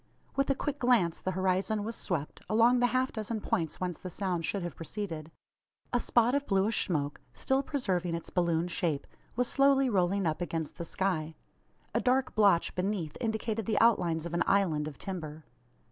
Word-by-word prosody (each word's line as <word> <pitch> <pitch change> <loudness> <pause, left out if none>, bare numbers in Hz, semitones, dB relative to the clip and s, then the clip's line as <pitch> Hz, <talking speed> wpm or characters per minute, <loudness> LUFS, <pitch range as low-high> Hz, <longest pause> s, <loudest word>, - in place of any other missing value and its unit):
With 275 +1 +1
a 275 - +3
quick 290 +1 -3
glance 235 -10 +3
the - - -2
horizon 190 +3 +1
was 225 +2 -4
swept, 155 -6 -3
along 230 +3 +5
the 245 - +4
half 255 +2 0
dozen 220 0 -3
points 165 -5 -2
whence 180 -2 -3
the 185 - -6
sound 180 -2 -2
should 200 -3 -1
have 175 - -5
proceeded. 165 -3 -5 0.6
A 245 - +3
spot 240 +1 +3
of 285 0 0
bluish 200 +2 +2
smoke 145 -6 -2
still 265 +1 +1
preserving 185 - -1
its 170 - -7
balloon 170 -1 +1
shape 165 -5 -1 0.3
was 250 +1 +1
slowly 275 -1 +4
rolling 190 0 +2
up 160 +1 -1
against 165 -3 -3
the 170 - -3
sky. 165 -4 -1 0.6
A - - +1
dark 260 +1 +2
blotch 200 -6 +4
beneath 180 -4 -2
indicated 220 -2 -2
the 225 - +2
outlines 175 -8 +3
of 170 - -5
an 170 - 0
"island" 165 -7 +2
of 145 -4 -8
timber. 160 -5 -6
190 Hz, 180 wpm, -30 LUFS, 170-230 Hz, 0.6 s, along